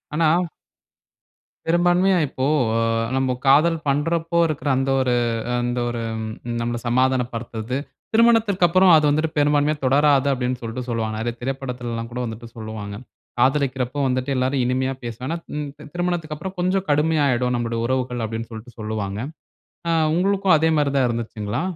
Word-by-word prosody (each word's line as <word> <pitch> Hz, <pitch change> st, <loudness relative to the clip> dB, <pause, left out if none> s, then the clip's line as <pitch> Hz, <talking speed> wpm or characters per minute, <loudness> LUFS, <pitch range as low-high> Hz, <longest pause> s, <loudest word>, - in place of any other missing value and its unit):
ஆனா 160 Hz, +1 st, +3 dB, 1.4 s
பெரும்பான்மையா 175 Hz, +2 st, +3 dB
இப்போ, 130 Hz, 0 st, -3 dB, 0.3 s
அ 115 Hz, -, +2 dB, 0.4 s
நம்ம 130 Hz, -1 st, +1 dB, 0.2 s
காதல் 155 Hz, +5 st, +5 dB
பண்றப்போ 165 Hz, +4 st, 0 dB
இருக்குற 150 Hz, -1 st, -2 dB
அந்த 135 Hz, +1 st, 0 dB
ஒரு 125 Hz, -2 st, +1 dB, 0.5 s
அந்த 120 Hz, 0 st, -1 dB
ஒரு 120 Hz, -1 st, -3 dB, 0.2 s
ம் 110 Hz, 0 st, -4 dB, 0.3 s
நம்மள 120 Hz, 0 st, -2 dB
சமாதானம் 130 Hz, 0 st, +2 dB
படுத்துறது, 115 Hz, +1 st, -4 dB, 0.4 s
திருமணத்திற்கப்பறம் 195 Hz, -6 st, +5 dB
அது 155 Hz, -1 st, +4 dB
வந்துட்டு 155 Hz, +2 st, 0 dB
பெரும்பான்மையா 145 Hz, +1 st, +3 dB
தொடராது 140 Hz, +1 st, +4 dB
அப்டீன்னு 125 Hz, -1 st, -2 dB
சொல்ட்டு 115 Hz, +2 st, -4 dB
சொல்லுவாங்க. 110 Hz, -2 st, -2 dB
நெறைய 120 Hz, +1 st, -2 dB
திரைப்படத்துலல்லாம் 125 Hz, -3 st, -4 dB
கூட 125 Hz, -, -5 dB
வந்துட்டு 115 Hz, +1 st, -7 dB
சொல்லுவாங்க. 110 Hz, -2 st, -6 dB, 0.4 s
காதலிக்கிறப்ப 130 Hz, 0 st, +1 dB
வந்துட்டு 130 Hz, +2 st, -1 dB
எல்லாரும் 130 Hz, +1 st, +1 dB
இனிமையா 130 Hz, +2 st, 0 dB
பேசுனானா, 125 Hz, +7 st, -4 dB, 0.2 s
ம் 150 Hz, -1 st, -3 dB, 0.2 s
திருமணத்துக்கப்பறம் 175 Hz, 0 st, -3 dB
கொஞ்சம் 185 Hz, +2 st, +1 dB
கடுமையாயிடும் 145 Hz, -5 st, +2 dB
நம்முடைய 115 Hz, -1 st, -2 dB
உறவுகள், 125 Hz, -2 st, -1 dB
அப்டீன்னு 115 Hz, +1 st, -5 dB
சொல்ட்டு 115 Hz, +2 st, -10 dB
சொல்லுவாங்க. 105 Hz, -2 st, -3 dB, 0.7 s
ஆ, 165 Hz, -, +2 dB, 0.2 s
உங்களுக்கும் 195 Hz, -2 st, +3 dB
அதே 160 Hz, +1 st, +2 dB
மாரி 145 Hz, -1 st, +2 dB
தான் 130 Hz, -2 st, +3 dB
இருந்ததுச்சுங்களா? 115 Hz, +1 st, -3 dB
130 Hz, 135 wpm, -22 LUFS, 120-155 Hz, 1.4 s, காதல்